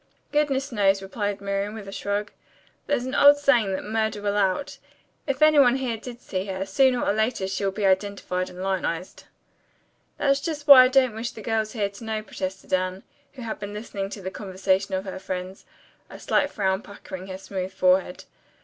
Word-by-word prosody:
"Goodness 280 -2 0
knows," 195 -3 +2
replied 205 0 -3
Miriam, 200 +1 -2
with 210 -3 -8
a - - -7
shrug. 205 +1 -3 0.6
"There's 275 -4 0
an 260 - -4
old 285 +1 +7
saying 245 -8 +3
that 190 - -3
'murder 220 0 -1
will 205 0 -1
out.' 200 +7 0 0.5
If 275 +2 +1
any 310 -1 +6
one 250 -2 +6
here 255 -3 -2
did 240 +2 -9
see 185 0 -3
her, 190 0 -3
sooner 250 +5 +3
or - - +2
later 220 -2 0
she'll 195 +1 -1
be 200 +1 -2
identified 190 -1 0
and 180 +1 -8
lionized." 185 -2 -3 0.9
"That's 275 -1 +2
just 300 0 -4
why 270 -3 +10
I - - +5
don't 255 -2 +3
wish 225 +2 -4
the 220 - -11
girls 220 -1 -1
here 210 -4 0
to 200 +3 -13
know," 220 -1 -3
protested 190 -2 -6
Anne, 185 +1 0 0.3
who 260 -3 -9
had 225 - -5
been 205 0 -6
listening 200 -2 -5
to 200 -1 -8
the 190 - -4
conversation 190 -1 -1
of 190 +1 -3
her 190 -1 -6
friends, 185 0 -6 0.4
a - - -11
slight 285 - +1
frown 190 -5 0
puckering 190 -2 -9
her 185 -1 -6
smooth 190 -1 -5
forehead. 185 -1 +1
205 Hz, 195 wpm, -25 LUFS, 190-240 Hz, 0.9 s, why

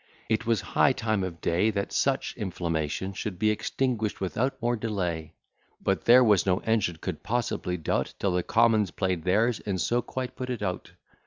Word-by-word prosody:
It 110 0 0
was 115 -4 +2
high 140 - +5
time 110 -5 -1
of 85 -3 -5
day 90 +6 +2
That 100 -2 -2
such 135 -1 0
inflammation 85 -3 -2
should 95 -1 -4
be 110 +3 +3
extinguish'd 110 0 -1
without 115 +8 -1
more 120 0 +1
delay: 90 -8 -3 0.4
But - - -1
there 125 +2 +8
was 105 -5 +4
no 90 -2 +2
engine 110 -6 +1
could 80 0 -5
possibly 105 -5 -1
do't, 80 - -1
Till 100 - 0
the 90 0 +1
commons 110 0 +3
play'd 90 -3 -2
theirs, 110 +6 +2
and 95 -3 -3
so 120 +7 +1
quite 130 +1 -5
put 130 0 -5
it 120 -4 -3
out. 90 -2 -3
105 Hz, 180 wpm, -27 LUFS, 90-115 Hz, 0.4 s, there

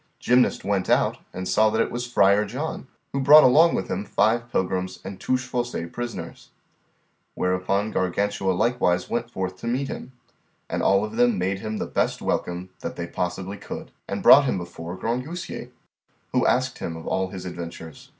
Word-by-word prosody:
Gymnast 125 +1 +2
went 100 -2 -1
out - - +2
and 95 0 -5
saw 110 0 +4
that 110 +1 -1
it - - +1
was 120 0 -3
Friar 100 -4 +4
John, 130 +7 -5 0.3
who 140 - 0
brought 150 +3 +9
along 160 +6 +6
with 95 - -2
him 95 - -2
five 120 +3 +1
pilgrims 95 0 -1
and 95 0 -7
Touchfaucet 120 -8 -2
prisoners; 120 -9 -6 0.9
whereupon 95 +3 0
Gargantua 95 +1 0
likewise 90 -3 +1
went 120 0 -1
forth 95 -4 -4
to 115 - -7
meet 130 +3 -1
him, 130 - -7 0.5
and - - -2
all 100 +2 +3
of 110 +1 -8
them 120 -3 +3
made 95 +2 -1
him 110 +1 -4
the - - -2
best - - -1
welcome 90 +1 -2
that - - -5 0.2
possibly 95 +3 -3
they - - -15
could, - - -7 0.2
and - - -4
brought 140 +1 +9
him 125 - 0
before 85 0 -7
Grangousier, 125 - -4 0.6
who - - +2
asked - - +1
him 80 -1 -4
of 80 - -10
all 95 0 0
his 95 0 -8
adventures. 85 -3 -8
100 Hz, 175 wpm, -24 LUFS, 90-120 Hz, 0.9 s, brought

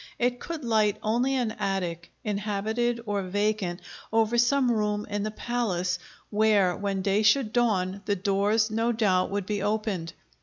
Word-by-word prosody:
It 245 0 0
could 320 -5 -6
light 215 -2 +2
only 245 +5 +1
an 245 -4 0
attic, 175 -4 -2
inhabited 215 +3 -1
or 205 -2 -1
vacant, 200 -1 -1 0.3
over 225 +1 +2
some 245 +2 +3
room 210 -2 0
in 205 0 -2
the 215 - -1
palace, 195 -6 -1 0.3
where, 205 -4 +3
when 200 -1 -2
day 200 +2 +2
should 220 +1 +3
dawn, 200 -5 +1
the 205 - +1
doors 205 +3 +1
no 225 +2 +1
doubt 200 -5 +2
would 200 -1 -2
be 205 0 -2
opened. 205 -6 -2
210 Hz, 155 wpm, -27 LUFS, 195-230 Hz, 0.3 s, some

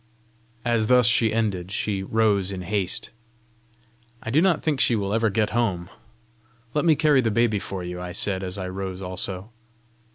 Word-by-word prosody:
As 115 -2 +1
thus 125 0 +5
she 110 0 +4
ended, 100 -5 -1
she 100 -2 -1
rose 100 -2 +1
in 95 -2 -5
haste. 95 0 -2 1.1
"I 115 - -4
do 150 +6 +4
not 180 -4 +2
think 150 -4 0
she 120 - +3
will 100 -1 -2
ever 115 0 +2
get 105 +2 0
home. 100 -6 -1 0.8
Let 150 - 0
me 160 -2 +5
carry 150 -3 +4
the 115 - 0
baby 110 -1 +2
for 95 -1 -6
you!" 90 0 -6
I 90 0 -5
said, 95 +1 -2
as 95 0 -4
I 95 -2 -4
rose 95 0 -5
also. 95 +3 -2
105 Hz, 175 wpm, -24 LUFS, 95-115 Hz, 1.1 s, thus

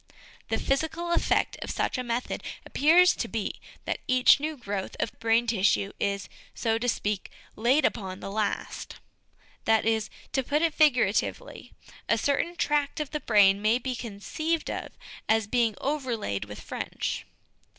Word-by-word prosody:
The - - +1
physical 320 +5 -1
effect - - +1
of - - -5
such - - -1
a 255 - -2
method 240 +1 -2 0.2
appears 345 +6 +5
to - - -2
be - - -4 0.2
that - - -2
each 255 0 +6
new 305 +1 -3
growth 200 -5 -4
of 220 - -1
brain 230 +1 +3
tissue 200 -3 +2
is, 200 -1 -1 0.3
so 225 -1 0
to 245 +1 0
speak, 205 -3 -2 0.3
laid 250 +7 +3
upon 190 -3 -2
the 195 - -6
last; 210 0 -3 0.7
that 220 -1 +3
is, 220 -1 +1 0.2
to 265 - +2
put 290 +5 0
it 330 -2 +2
figuratively, 280 - +1 0.4
a - - +4
certain 335 +5 0
tract 295 -1 0
of 300 -2 -3
the 300 - -2
brain 205 -5 +4
may 215 +3 +3
be 255 0 -3
conceived 280 +10 -3
of - - -4 0.4
as 220 -1 +3
being 230 0 +1
overlaid 245 - -2
with 105 0 -9
French. - - -4
240 Hz, 155 wpm, -27 LUFS, 210-295 Hz, 0.7 s, each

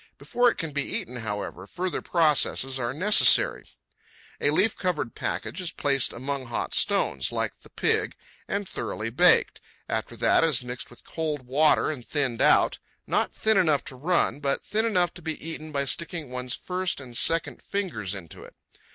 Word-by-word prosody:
Before 245 0 +2
it - - -4
can 165 -2 -3
be 145 0 -1
eaten, 125 -2 -4
however, 105 -4 -5
further 180 - -3
processes 150 -5 +2
are 120 -1 -1
necessary. 195 - +4 0.7
A - - +2
leaf 205 +8 +2
covered 170 -10 -2
package - - -4
is 175 - -4
placed 140 -3 0
among 135 +1 -4
hot 120 - -3
stones, 65 -1 +2
like - - -3
the - - -16
pig, - - 0 0.3
and 200 0 -2
thoroughly 115 -7 -4
baked. 120 - +4 0.3
After - - -3
that - - +3
it - - +4
is 130 -5 +2
mixed 125 0 -7
with 120 - -16
cold 155 -4 -3
water 150 +4 +3
and 135 -6 -7
thinned 135 -4 -1
out—not - - +1
thin 220 -1 +3
enough 155 -6 +3
to 130 - -8
run, 155 +1 +1
but 140 -1 -1
thin 220 +2 0
enough 180 -6 +1
to 180 - -11
be 160 -1 -3
eaten 155 -1 -7
by 140 -1 0
sticking 165 -1 -2
one's 125 0 -3
first 185 -2 -3
and 125 -3 -10
second 165 +6 +2
fingers 115 - -3
into 85 -5 -10
it. - - -14
145 Hz, 175 wpm, -26 LUFS, 125-175 Hz, 0.7 s, necessary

